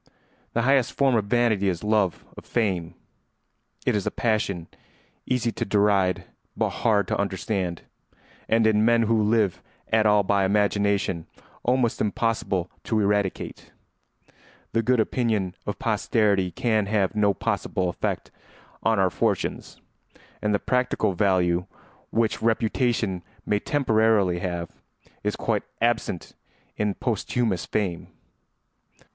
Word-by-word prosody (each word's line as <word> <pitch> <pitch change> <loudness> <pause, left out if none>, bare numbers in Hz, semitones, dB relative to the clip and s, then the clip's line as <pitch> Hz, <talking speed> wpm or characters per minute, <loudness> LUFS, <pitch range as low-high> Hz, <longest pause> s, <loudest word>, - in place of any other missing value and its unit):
] - - -38
The 115 - +2
highest 135 -1 +3
form 135 -2 +2
of 110 -3 +2
vanity 110 -3 +2
is 90 0 -3
love 105 -4 +1
of - - -10
fame. 90 -7 -1 0.9
It - - +2
is 100 - -1
a - - +4
passion 105 -7 -1 0.6
easy 120 -2 +1
to - - -3
deride 100 -3 +2 0.3
but - - +1
hard 105 -4 +3
to - - -1
understand, 95 -3 -2 0.7
and 115 0 +3
in 110 -1 +4
men 115 0 +4
who 115 0 +2
live 105 -3 +2 0.3
at 110 -1 +4
all 105 -1 +4
by 100 0 +2
imagination 100 -3 +1 0.3
almost 125 -1 +1
impossible 105 -4 -1
to 110 - +1
eradicate. 100 -2 -1 1.0
The 115 - +2
good 125 +2 +2
opinion 110 -5 0
of - - -2
posterity 100 -4 +1
can 110 +3 0
have 100 -2 +1
no 105 -2 +2
possible 90 +2 -1
effect 90 - -3 0.5
on 110 -1 +2
our 95 -2 +3
fortunes, - - -2 0.6
and 105 - 0
the 105 - +3
practical 125 -4 0
value 90 -2 +2 0.4
which 115 -1 0
reputation 110 -3 +1 0.2
may 105 - +1
temporarily 110 -9 +2
have 85 -2 -3 0.5
is - - -1
quite - - 0 0.2
absent 115 -6 -1 0.4
in 105 -1 -1
posthumous 110 -5 -1
fame. 95 -6 -2
105 Hz, 130 wpm, -25 LUFS, 95-115 Hz, 1.0 s, a